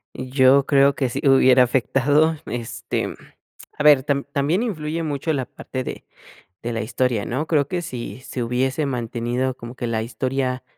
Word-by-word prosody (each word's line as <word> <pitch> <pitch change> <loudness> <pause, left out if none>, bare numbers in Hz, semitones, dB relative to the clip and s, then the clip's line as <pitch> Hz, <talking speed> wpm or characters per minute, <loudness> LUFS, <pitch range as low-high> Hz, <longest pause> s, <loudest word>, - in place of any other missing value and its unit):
Yo 130 +1 +3
creo 140 0 +4
que 130 -3 0
si 120 - -4
hubiera 130 -1 +6
afectado, 140 +5 +2
este. 115 0 -4 0.6
A - - 0
ver, 145 -3 +7
tam 140 0 -1
también 150 +10 +1
influye 165 -7 -3
mucho 150 +1 -2
la 135 -4 -2
parte 130 -1 -6
de - - -7 0.6
de 120 - -3
la 115 - -2
historia, 120 -1 -1
¿no? 130 +6 -2
Creo 145 -3 +1
que 175 +1 -2
si 130 -4 -7
se 130 - -6
hubiese 130 +5 0
mantenido 125 0 -2
como 120 +1 -10
que 125 - -4
la 115 -2 -1
historia 130 +2 -2
130 Hz, 165 wpm, -22 LUFS, 125-145 Hz, 0.6 s, ver